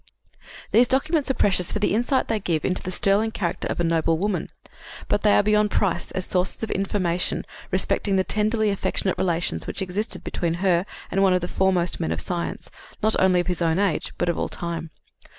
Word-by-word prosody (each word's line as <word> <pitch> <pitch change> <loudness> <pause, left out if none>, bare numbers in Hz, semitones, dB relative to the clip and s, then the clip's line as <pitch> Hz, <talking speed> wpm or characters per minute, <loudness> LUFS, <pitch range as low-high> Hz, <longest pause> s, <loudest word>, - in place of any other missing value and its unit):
These 240 +3 +5
documents 285 +3 +1
are 265 - +1
precious 185 -3 +2
for - - -1
the 210 -1 +1
insight 245 +5 +1
they 225 -1 0
give 165 -6 -1
into 185 - 0
the - - -5
sterling 200 +4 +2
character 185 -6 -2
of - - -3
a - - +2
noble 165 -1 +2
woman, 190 -2 -2 0.6
but 205 - +1
they 210 -1 +4
are - - +4
beyond 210 0 +3
price 175 - 0
as 185 - -2
sources 185 +4 0
of 220 - -2
information 185 -3 -1 0.2
respecting 200 -2 +1
the 190 - +3
tenderly 215 +1 +1
affectionate 195 -1 -1
relations 175 -1 0
which - - -4
existed 195 +5 -3
between 170 -1 -2
her 180 0 +1 0.2
and 195 - +1
one 190 -1 +4
of 180 - +2
the 175 - -3
foremost 180 -2 +1
men 80 - -1
of 80 - -2
science, 170 - -4 0.3
not 220 0 +4
only 185 -1 +4
of - - -6
his 180 -1 -2
own 165 0 +2
age, 195 -6 0
but 175 - -1
of 170 - 0
all - - -1
time. 170 -1 -4
190 Hz, 205 wpm, -24 LUFS, 175-210 Hz, 0.6 s, These